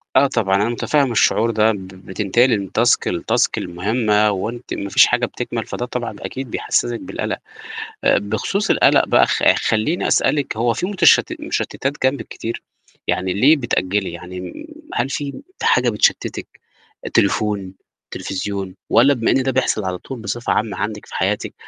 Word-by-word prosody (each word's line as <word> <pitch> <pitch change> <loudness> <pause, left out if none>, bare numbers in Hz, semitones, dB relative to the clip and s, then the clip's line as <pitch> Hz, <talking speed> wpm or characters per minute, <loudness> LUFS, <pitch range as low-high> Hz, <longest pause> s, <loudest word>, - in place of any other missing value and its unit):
آه، 135 +2 +6
طبعًا 110 -8 +1
أنا 105 +3 +1
مُتفهِّم 135 +3 +1
الشعور 115 0 +3
ده، 110 0 +3
ب 95 -3 -6
بتنتقلي 100 +5 +1
من 100 - -5
task 120 0 +4 0.2
لtask - - +1
لمُهمّة، 105 +4 +1
وأنتِ 115 +5 -4
ما 100 - -4
فيش - - +7
حاجة - - +1
بتكمل، - - -4
فده 120 - -4
طبعًا 125 -1 -4
أكيد 130 -3 -6
بيحسّسِك 120 -1 0
بالقلق. - - -4 0.7
آآ، - - +4
بخصوص 110 - -2
القلق - - +4
بقى - - +5
خ - - -1
خلّيني 110 +11 0
أسألك، 145 -6 +1
هو 115 +1 +2
في 145 - -2
متشت 185 -5 +4
مُشتتات 135 - -2
جنبِك 135 +2 -1
كتير؟ 115 +1 -6 0.4
يعني 90 0 0
ليه 135 - +5
بتأجّلي، 100 - -1
يعني 90 +2 -8
م 90 -1 -7 0.4
هل 120 +3 0
في 145 - -4 0.2
حاجة - - +3
بتشتتِك - - 0 0.7
تليفون، 100 -3 +1 0.4
تليفزيون، 95 -1 -4 0.2
والّا 135 +5 +5
بما 115 -3 0
إن 135 - +3
ده 130 0 0
بيحصل 125 -5 0
على 90 -1 -3
طول، 130 +4 -8
بصفة 115 +3 -2
عامة 110 -1 -1
عندِك 105 0 -4
في - - -12
حياتِك، - - -1
110 Hz, 160 wpm, -20 LUFS, 100-125 Hz, 0.7 s, فيش